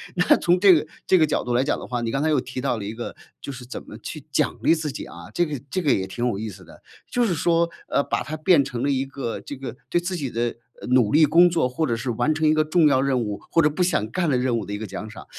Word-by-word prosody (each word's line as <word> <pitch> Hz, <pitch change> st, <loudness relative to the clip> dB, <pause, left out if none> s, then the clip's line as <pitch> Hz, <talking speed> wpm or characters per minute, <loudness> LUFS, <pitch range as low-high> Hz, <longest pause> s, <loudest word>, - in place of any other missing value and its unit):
那 180 Hz, 0 st, +4 dB
从 175 Hz, +1 st, +2 dB
这 195 Hz, 0 st, +7 dB
个 155 Hz, -, +2 dB, 0.2 s
这 185 Hz, -, +5 dB
个 160 Hz, -, +5 dB
角 -, -, 0 dB
度 120 Hz, -, -2 dB
来 125 Hz, +2 st, +3 dB
讲 140 Hz, -, 0 dB
的 -, -, -8 dB
话 125 Hz, -1 st, -2 dB
你 115 Hz, -1 st, -2 dB
刚 135 Hz, -, -1 dB
才 160 Hz, -, +1 dB
又 150 Hz, -3 st, +3 dB
提 130 Hz, 0 st, -5 dB
到 120 Hz, -, 0 dB
了 105 Hz, -, -6 dB
一 105 Hz, -, -5 dB
个 120 Hz, +1 st, -6 dB, 0.3 s
就 -, -, -6 dB
是 125 Hz, -2 st, -9 dB
怎 125 Hz, -, -7 dB
么 110 Hz, -, -10 dB
去 145 Hz, +5 st, -8 dB
奖 -, -, 0 dB
励 165 Hz, -, +5 dB
自 155 Hz, -2 st, -3 dB
己 140 Hz, -, -7 dB
啊， -, -, -11 dB
这 175 Hz, -, +2 dB
个 150 Hz, -4 st, -4 dB
这 185 Hz, -, 0 dB
个 150 Hz, -5 st, +2 dB
也 95 Hz, -, +1 dB
挺 120 Hz, +5 st, -3 dB
有 115 Hz, -, -1 dB
意 110 Hz, +2 st, -4 dB
思 95 Hz, -, -12 dB
的， -, -, -16 dB, 0.3 s
就 245 Hz, -1 st, +1 dB
是 195 Hz, -, +1 dB
说， 170 Hz, +1 st, +2 dB, 0.2 s
呃， -, -, +1 dB
把 -, -, -2 dB
它 155 Hz, -, -5 dB
变 155 Hz, -2 st, +4 dB
成 125 Hz, -2 st, -4 dB
了 140 Hz, -, +1 dB
一 135 Hz, -1 st, 0 dB
个 135 Hz, -3 st, -5 dB
这 145 Hz, -, -7 dB
个 130 Hz, -3 st, -7 dB
对 175 Hz, -, +2 dB
自 180 Hz, +2 st, -3 dB
己 145 Hz, -6 st, -3 dB
的， 120 Hz, 0 st, -2 dB, 0.3 s
呃， -, -, -7 dB
努 125 Hz, -4 st, +4 dB
力 155 Hz, +1 st, +6 dB
工 170 Hz, +4 st, +6 dB
作 165 Hz, -6 st, +1 dB
或 135 Hz, +6 st, -1 dB
者 120 Hz, -, 0 dB
是 120 Hz, +2 st, -3 dB
完 120 Hz, +7 st, +1 dB
成 155 Hz, 0 st, +1 dB
一 155 Hz, -, +5 dB
个 155 Hz, 0 st, +3 dB
重 155 Hz, +1 st, +3 dB
要 130 Hz, -3 st, +3 dB
任 135 Hz, -2 st, +1 dB
务， 105 Hz, -3 st, -3 dB
或 165 Hz, -, +4 dB
者 150 Hz, -, +4 dB
不 155 Hz, +5 st, -1 dB
想 155 Hz, -, 0 dB
干 170 Hz, +7 st, -1 dB
的 130 Hz, -, +2 dB
任 125 Hz, -1 st, +1 dB
务 110 Hz, -, -4 dB
的 100 Hz, -, -6 dB
一 -, -, -2 dB
个 110 Hz, +1 st, -6 dB
奖 110 Hz, +3 st, -7 dB
赏， 110 Hz, -, -11 dB
140 Hz, 340 characters per minute, -23 LUFS, 120-160 Hz, 0.3 s, 这